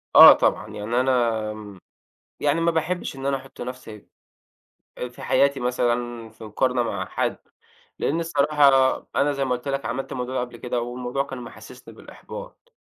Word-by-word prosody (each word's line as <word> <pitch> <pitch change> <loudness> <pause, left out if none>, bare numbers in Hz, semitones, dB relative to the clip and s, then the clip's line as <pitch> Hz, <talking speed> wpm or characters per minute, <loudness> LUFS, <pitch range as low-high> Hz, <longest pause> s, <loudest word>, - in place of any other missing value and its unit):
آه، - - +12
طبعًا، - - 0
يعني 105 +3 -2
أنا 110 -5 -1 0.6
يعني، 150 +3 +1
ما 170 0 +3
باحبش 165 0 -2
إن 135 0 -7
أنا 140 -1 +1
أحط 135 +1 -13
نفسي 120 -4 -8 0.9
آآ، 125 - -3
في 120 - -14
حياتي 140 +1 +2
مثلًا، 120 -1 -1
في 110 +1 -14
مقارنة 125 +3 0
مع 115 - -3
حد. - - -2 0.6
لأن 160 +4 0
الصراحة 140 -4 +4 0.2
أنا 145 +1 +3
زي 140 -1 -1
ما 125 - +1
قُلت 125 +3 -9
لك، 140 0 -2
عملت 125 +3 -4
الموضوع 125 +1 -4
ده - - +1
قبل 120 -1 -6
كده، 120 0 -2
والموضوع 125 +3 -3
كان 135 -2 -8
محسسني 120 - -12
بالإحباط؛ - - -11
125 Hz, 165 wpm, -24 LUFS, 120-140 Hz, 0.9 s, آه